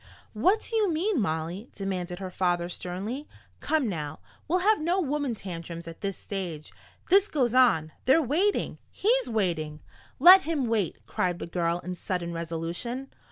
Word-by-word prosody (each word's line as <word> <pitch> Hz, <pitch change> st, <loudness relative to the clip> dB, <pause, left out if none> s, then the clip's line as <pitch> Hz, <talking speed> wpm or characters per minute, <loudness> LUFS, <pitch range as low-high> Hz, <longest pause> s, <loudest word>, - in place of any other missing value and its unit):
"What 370 Hz, -, +2 dB
do 460 Hz, -, -4 dB
you 420 Hz, -5 st, +3 dB
mean, 335 Hz, -, +1 dB
Molly?" 170 Hz, +5 st, -3 dB
demanded 185 Hz, -3 st, -3 dB
her 190 Hz, -1 st, -6 dB
father 175 Hz, -1 st, 0 dB
sternly. 200 Hz, +11 st, -5 dB, 0.3 s
"Come 310 Hz, -5 st, +1 dB
now, 155 Hz, -6 st, -4 dB, 0.3 s
we'll 345 Hz, +4 st, +2 dB
have 430 Hz, -5 st, +4 dB
no 345 Hz, +4 st, +1 dB
woman 290 Hz, -6 st, -1 dB
tantrums 170 Hz, -3 st, -7 dB
at 165 Hz, -, -9 dB
this 195 Hz, -2 st, -3 dB
stage! 175 Hz, -6 st, -6 dB, 0.4 s
This 395 Hz, +2 st, +6 dB
goes 255 Hz, -, +1 dB
on! 225 Hz, -12 st, +4 dB
They're 265 Hz, +5 st, +6 dB
waiting! 325 Hz, -, 0 dB
He's -, -, +1 dB
waiting!" 165 Hz, -8 st, -1 dB, 0.4 s
"Let 365 Hz, +6 st, +10 dB
him 310 Hz, -6 st, -1 dB
wait!" 220 Hz, -6 st, -1 dB
cried 180 Hz, -1 st, -1 dB
the -, -, -5 dB
girl 170 Hz, 0 st, 0 dB
in 180 Hz, -, -5 dB
sudden 175 Hz, -1 st, -3 dB
resolution. 170 Hz, +11 st, -4 dB
200 Hz, 160 wpm, -27 LUFS, -, 0.4 s, Let